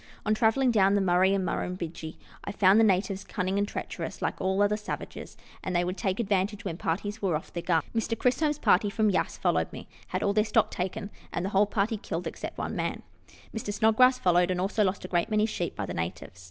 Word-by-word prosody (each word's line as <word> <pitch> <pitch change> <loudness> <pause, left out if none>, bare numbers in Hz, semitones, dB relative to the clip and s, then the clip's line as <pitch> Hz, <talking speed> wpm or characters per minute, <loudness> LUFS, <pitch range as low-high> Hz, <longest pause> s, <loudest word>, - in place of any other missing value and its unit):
On 215 - +3
travelling 240 +4 +3
down 200 -3 +4
the - - +3
Murray 185 0 +3
and 195 -1 +1
Murrumbidgee, 170 -3 -4 0.3
I - - -4
found 200 +1 +5
the - - +6
natives 195 -1 +1
cunning 190 -1 -2
and 205 - +1
treacherous, - - -5
like - - -3
all 190 +2 +2
other 205 +1 +2
savages, 210 +1 -7 0.3
and 185 - -3
they 175 - +3
would 180 +1 -2
take 195 -1 -2
advantage 205 -1 0
when 175 -4 -3
parties 205 +7 -3
were 185 -5 +1
off 155 - -6
their 170 - -3
guard. 170 -3 +1
Mr. 230 0 -1
Chisholm's 295 +4 +1
party, 205 -7 +3
from 215 0 +2
Yass, 190 - -1
who - - -26
followed - - +1
me, - - -9 0.2
had - - -2
all 200 - +2
their 215 +1 +3
stock 215 0 +2
taken, 190 +3 -4 0.2
and 175 - -2
the - - -1
whole 200 +1 +3
party 215 +2 0
killed 180 -3 -5
except - - -6
one - - -3
man. - - -3 0.5
Mr. 220 -2 -3
Snodgrass 225 +5 +4
followed, 180 0 +3
and 180 -1 0
also 200 +3 +1
lost 190 -1 -1
a - - -4
great 175 +2 0
many 215 -1 +2
sheep 175 -6 -3
by 100 - -3
the - - -5
natives. 85 +3 -5
195 Hz, 230 wpm, -28 LUFS, 180-215 Hz, 0.5 s, the